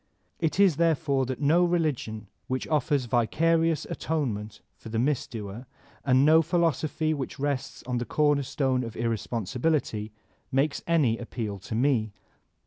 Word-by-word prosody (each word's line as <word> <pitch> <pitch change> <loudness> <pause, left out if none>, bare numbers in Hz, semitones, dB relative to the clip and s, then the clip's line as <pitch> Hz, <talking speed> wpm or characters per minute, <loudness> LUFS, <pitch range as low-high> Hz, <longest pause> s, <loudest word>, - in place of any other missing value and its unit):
It 165 +2 -1
is 190 -7 +5
therefore 155 -5 +2
that 130 -1 -4
no 160 +5 +4
religion 150 - -1 0.2
which 130 0 -2
offers 150 -3 +1
vicarious 160 +7 +2
atonement 110 -10 -3
for 110 - -11
the 110 - -2
misdoer, 120 -4 -2 0.4
and 130 0 +4
no 160 +2 +7
philosophy 160 -1 0
which 140 -3 -5
rests 140 -2 -3
on 125 -1 -2
the 120 - -3
cornerstone 140 -3 +1
of 115 -2 -7
irresponsibility, 115 - -1 0.4
makes 140 +2 +1
any 145 -9 +2
appeal 110 -4 -5
to 105 +4 -6
me. 115 -4 +1
135 Hz, 135 wpm, -27 LUFS, 115-155 Hz, 0.4 s, no